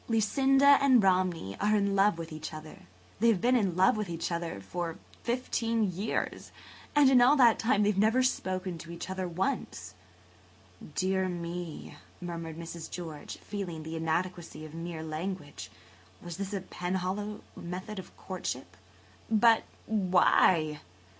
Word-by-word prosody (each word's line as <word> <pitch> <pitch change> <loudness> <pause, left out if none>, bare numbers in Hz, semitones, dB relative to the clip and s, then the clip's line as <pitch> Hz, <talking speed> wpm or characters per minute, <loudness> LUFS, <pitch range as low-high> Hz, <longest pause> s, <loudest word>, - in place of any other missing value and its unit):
Lucinda 270 +5 +4
and 260 -5 +5
Romney 180 - +1
are 210 +1 +3
in 200 -1 +1
love 195 -2 +4
with 165 0 -6
each 155 0 -6
other. 155 - -11 0.3
They 230 - +3
have 225 -5 +4
been 250 +6 +3
in 195 -8 +1
love 185 +3 +4
with 210 -3 -3
each 170 +1 -3
other 170 -8 -3
for 165 - -4 0.2
fifteen 230 -3 0
years 200 +5 -3 0.4
and 290 -2 +6
in 260 -2 +6
all 255 +4 +6
that 240 -5 +5
time 225 -3 +2
they 205 - +4
have 195 - -2
never 225 +5 +4
spoken 185 -7 -1
to 165 - -10
each 170 +2 -6
other 190 -1 -2
once!" 185 +11 -3 1.0
"Dear 190 0 +1
me!" 175 -1 -6 0.2
murmured 170 -2 -6
Mrs. 170 -1 -7
George, 160 -4 -7
feeling 180 -6 -5
the 160 +1 -6
inadequacy 165 0 -2
of 155 - -11
mere 165 -1 -5
language. 160 -1 -5 0.5
Was 175 0 -8
this 195 0 -4
a 200 -2 -2
Penhallow 190 +4 -3
method 185 +4 -6
of 185 - -12
courtship? 130 - -5 0.5
"But 225 +1 +5 0.2
why? 180 -6 +3
185 Hz, 150 wpm, -30 LUFS, 165-210 Hz, 1.0 s, and